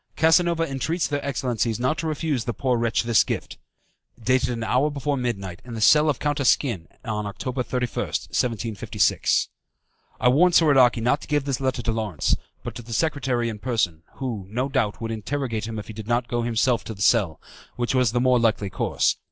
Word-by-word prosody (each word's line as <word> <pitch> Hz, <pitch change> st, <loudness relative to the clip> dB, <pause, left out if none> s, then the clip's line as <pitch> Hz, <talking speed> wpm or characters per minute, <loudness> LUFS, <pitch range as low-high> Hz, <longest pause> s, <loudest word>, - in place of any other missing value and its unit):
Casanova 165 Hz, +1 st, +3 dB
entreats 155 Hz, +5 st, -1 dB
their 145 Hz, -1 st, -2 dB
excellencies 120 Hz, -4 st, -1 dB
not 130 Hz, +5 st, +1 dB
to 165 Hz, -, -2 dB
refuse 150 Hz, -5 st, -1 dB
the 120 Hz, -, -3 dB
poor 125 Hz, +2 st, +1 dB
wretch 115 Hz, -1 st, +1 dB
this 115 Hz, -2 st, +4 dB
gift. -, -, -5 dB, 0.6 s
Dated 125 Hz, +2 st, +1 dB
an 115 Hz, -2 st, -3 dB
hour 130 Hz, +6 st, +2 dB
before 145 Hz, 0 st, -2 dB
midnight, 100 Hz, -8 st, -3 dB
in 120 Hz, -1 st, -8 dB
the -, -, -4 dB
cell 150 Hz, +7 st, +5 dB
of 145 Hz, -, +1 dB
Count 145 Hz, 0 st, -1 dB
Asquin, 120 Hz, -, +1 dB, 0.2 s
on 105 Hz, -3 st, -2 dB
October 125 Hz, +6 st, -4 dB
31st, 125 Hz, -1 st, -3 dB
1756." 115 Hz, -3 st, 0 dB, 0.7 s
I 125 Hz, -, +3 dB
warned 170 Hz, +8 st, +5 dB
Soradaci 130 Hz, -7 st, +5 dB
not 135 Hz, +5 st, +2 dB
to -, -, -10 dB
give 145 Hz, -2 st, +1 dB
this 135 Hz, -2 st, -2 dB
letter 130 Hz, -2 st, -1 dB
to 115 Hz, -, 0 dB
Lawrence, 110 Hz, -8 st, 0 dB, 0.3 s
but -, -, -5 dB
to -, -, -8 dB
the 115 Hz, 0 st, -8 dB
secretary 130 Hz, -4 st, 0 dB
in 110 Hz, -2 st, -5 dB
person, 105 Hz, -9 st, -1 dB
who, 115 Hz, -8 st, -5 dB
no 125 Hz, +6 st, -1 dB
doubt, 110 Hz, -4 st, -1 dB
would 115 Hz, 0 st, -3 dB
interrogate 115 Hz, -1 st, -3 dB
him 115 Hz, -1 st, -5 dB
if 105 Hz, -, -5 dB
he 110 Hz, -, -9 dB
did 110 Hz, 0 st, -8 dB
not 120 Hz, +1 st, +1 dB
go 120 Hz, 0 st, -1 dB
himself 120 Hz, +1 st, +1 dB
to 110 Hz, -, -6 dB
the 100 Hz, -, -11 dB
cell, 95 Hz, -11 st, +3 dB, 0.4 s
which 120 Hz, +1 st, -1 dB
was 125 Hz, -4 st, +3 dB
the 120 Hz, -, +1 dB
more 125 Hz, 0 st, +4 dB
likely 110 Hz, -4 st, +1 dB
course. -, -, 0 dB
120 Hz, 200 wpm, -24 LUFS, 110-135 Hz, 0.7 s, cell